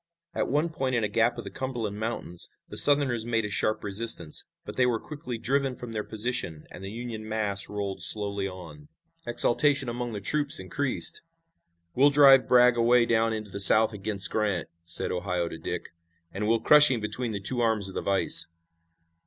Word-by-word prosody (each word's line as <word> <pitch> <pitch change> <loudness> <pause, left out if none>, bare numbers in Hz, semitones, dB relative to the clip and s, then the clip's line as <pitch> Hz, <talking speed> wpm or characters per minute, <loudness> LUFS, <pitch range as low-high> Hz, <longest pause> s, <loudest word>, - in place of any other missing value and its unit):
At - - -2
one 150 +5 -1
point 135 -5 -3
in 115 - -1
a - - 0
gap 115 +3 0
of - - -7
the - - -10
Cumberland 115 -6 -6
Mountains 110 -6 -4 0.2
the - - -11
Southerners 140 -5 +5
made 115 -1 -2
a 105 - -6
sharp 110 +2 -2
resistance, 100 -6 -1 0.2
but - - -9
they 125 -1 +1
were 115 -2 -1
quickly 135 -5 -8
driven 135 +2 -2
from 120 -2 -10
their 105 -1 -4
position 110 -9 -2
and 90 - -12
the 95 - -7
Union 110 -1 -8
mass 105 -3 -1
rolled 100 -2 -5
slowly 100 -2 -1
on. 80 -6 -12 0.4
Exultation 135 +3 0
among 120 0 -6
the 105 - -5
troops 145 +8 +1
increased. 130 +9 -3 0.7
"We'll 140 +3 +3
drive 140 -2 +5
Bragg 125 -1 +4
away 120 +1 +3
down 115 -1 0
into 110 -2 -6
the 100 - -7
South 110 +3 +7
against 100 -1 -3
Grant," 105 -6 -2
said 85 0 0
Ohio 90 -1 -3
to 80 - -10
Dick, - - -6 0.4
"and 105 +2 -5
we'll 115 0 0
crush 150 +3 +8
him 125 -3 -1
between 110 +3 -2
the 100 - -5
two 120 +6 0
arms 110 -4 0
of 95 - -6
the - - -4
vise. 100 -1 +3
115 Hz, 190 wpm, -25 LUFS, 100-125 Hz, 0.7 s, crush